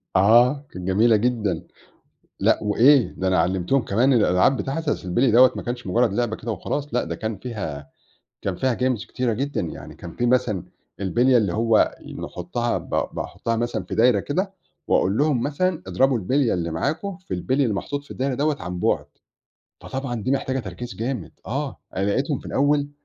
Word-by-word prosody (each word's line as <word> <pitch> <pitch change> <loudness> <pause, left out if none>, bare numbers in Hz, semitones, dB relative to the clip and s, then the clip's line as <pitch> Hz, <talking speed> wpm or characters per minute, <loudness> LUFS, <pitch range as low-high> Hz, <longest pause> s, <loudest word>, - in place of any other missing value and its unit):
آه، 120 +8 +5
كانت 90 0 -7
جميلة 110 +4 +4
جدًا، 105 -6 0 0.7
لأ - - +3
وإيه، 120 +6 +4
ده 95 - -1
أنا 95 - +3
علّمتهم 95 +9 +1
كمان 120 +5 +2
الألعاب 105 +2 +3
بتاعة 135 +4 -2
أصل 125 -9 -1
البِلْي 120 +9 +2
دوّة 125 +3 +7
ما - - -4
كانش 120 -2 -5
مجرد 115 +3 +2
لعبة 115 0 0
كده 115 +1 -5
وخلاص، 140 +9 -4
لأ 125 - +2
ده 85 0 -4
كان 110 +2 -4
فيها 90 - -6 0.5
كان 95 -2 -2
فيها 130 +5 +1
Games 125 -2 -1
كتيرة 125 -2 -1
جدًا، 140 +6 -2
يعني 80 - -6
كان 85 - -10
في 120 - 0
مثلًا 115 -7 +1 0.4
البِلية 120 +7 +3
اللي 105 -7 +2
هو 115 0 +3 0.3
نحطّها 115 +7 -2
ب - - -12 0.2
باحطّها 115 0 -3
مثلًا 120 +1 -2
في - - -5
دايرة 115 -3 +4
كده، 185 - -2 0.4
وأقول 95 +3 +2
لهم 145 -4 +2
مثلًا 160 +5 -1
أضربوا 135 -2 +2
البِلية 130 +5 +1
اللي 85 -2 -2
معاكم 160 - -2
في 185 - -6
البِلي 130 +10 0
اللي 115 -6 +1
محطوط 145 +8 -4
في - - -22
الدايرة 135 0 -1
دوّة 145 +3 +1
عن 90 0 -4
بُعد، - - +1 0.8
فطبعًا 135 -2 -4
دي 130 - -1
محتاجة 135 -1 0
تركيز 110 +2 -7
جامد 115 -8 -4
آه، 140 +3 -3 0.2
أنا 95 - 0
لقيتهم 135 +7 0
في - - -15
الأول 145 +1 +1
120 Hz, 180 wpm, -23 LUFS, 100-135 Hz, 0.8 s, دوّة